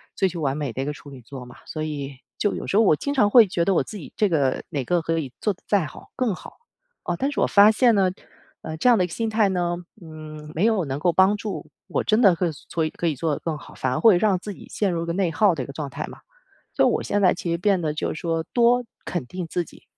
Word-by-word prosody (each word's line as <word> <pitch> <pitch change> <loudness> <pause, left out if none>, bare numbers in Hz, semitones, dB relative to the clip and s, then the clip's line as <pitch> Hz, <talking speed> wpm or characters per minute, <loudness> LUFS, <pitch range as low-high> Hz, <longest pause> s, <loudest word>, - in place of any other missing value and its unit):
追 190 - +2
求 175 -1 -6
完 135 -2 0
美 145 -4 -3
的 120 - -7
一 - - -4
个 150 - -2
处 145 - -13
女 135 -2 -11
座 130 +2 -9
嘛。 125 0 -13
所 155 - -6
以 145 -3 -4 0.2
就 205 - +1
有 - - -5
时 195 - +1
候 225 - +6
我 185 - +5
经 285 - -3
常 210 -6 +3
会 235 -2 +8
觉 175 -3 0
得 195 - +3
我 - - +3
自 215 - -7
己 165 - -10
这 210 - +2
个 140 -6 +1
哪 140 -3 -2
个 175 +4 +1
可 165 0 -1
以 140 -6 -4
做 210 - +1
得 180 - -27
再 200 -5 +2
好 - - -14
更 240 -7 0
好， - - -12 0.5
啊， 175 - -2
但 275 +10 -1
是 - - -3
我 - - +3
发 205 +1 +7
现 235 +1 +4
呢， 190 -2 +3 0.5
呃， 160 0 -6
这 170 - +1
样 245 - +7
的 180 - +3
一 - - -5
个 - - -14
心 230 - -2
态 215 -2 +2
呢， 175 -2 0 0.2
嗯， 155 -2 -10
没 165 - -1
有 220 -6 +2
能 135 0 -3
够 175 +3 +2
帮 190 +4 +4
助 210 0 -5 0.2
我 - - -1
真 215 +2 +2
的 195 -7 +6
可 180 - -1
以 170 - 0 0.2
做 160 -1 0
可 170 - -1
以 155 - 0
做 155 +4 -1
得 - - -3
更 160 -2 -2
好， - - -13
反 130 - -2
而 130 - -1
会 215 -6 +6
让 200 -1 +3
自 205 +3 -7
己 - - -13
陷 200 -3 0
入 170 -1 -2
一 - - -3
个 170 - -1
内 180 -2 0
耗 200 -1 +3
的 135 - -3
一 - - -7
个 140 - -9
状 145 0 -5
态 - - -5
嘛。 - - -11 0.6
所 - - +4
以 - - +5
我 - - 0
现 205 - -1
在 185 - +5
其 175 - -5
实 170 - 0
变 190 +1 +2
得 155 -2 -1
就 - - -2
是 - - -7
说 165 -1 -1
多 245 +1 +4 0.2
肯 175 -7 -3
定 180 +3 -5
自 175 +2 -1
己， - - -17
175 Hz, 325 characters per minute, -23 LUFS, 155-205 Hz, 0.6 s, 会